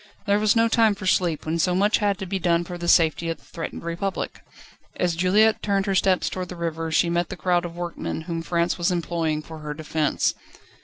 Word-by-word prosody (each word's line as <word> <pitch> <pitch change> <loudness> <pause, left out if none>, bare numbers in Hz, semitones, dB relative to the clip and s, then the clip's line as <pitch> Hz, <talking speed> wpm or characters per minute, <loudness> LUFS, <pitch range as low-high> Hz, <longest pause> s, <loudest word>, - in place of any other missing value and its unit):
There 200 0 +3
was 215 +1 +3
no 230 0 +4
time 225 -2 +3
for 195 -1 -8
sleep, 175 -4 +1
when 160 +2 -1
so 180 +2 +2
much 205 +3 +3
had 205 -2 +1
to 195 - -5
be 190 +1 -2
done 170 -1 +2
for 175 +1 -7
the 175 0 -5
safety 165 0 +3
of 165 - -2
the - - -26
threatened 165 - -7
Republic. 170 +4 -3 0.5
As 175 -2 0
Juliette 205 +6 +3
turned 200 -1 0
her 195 - 0
steps 190 -1 +2
towards 185 -1 -4
the 180 - -7
river, 165 -1 -3
she 165 +2 +3
met 170 0 0
the 185 - -6
crowd 175 -1 +1
of 170 -1 -7
workmen, 175 -2 -4
whom 165 0 -4
France 170 +1 0
was 175 - +2
employing 165 -3 -1
for 160 0 -10
her 150 -1 -6
defence. 155 -1 0
175 Hz, 225 wpm, -24 LUFS, 165-190 Hz, 0.5 s, no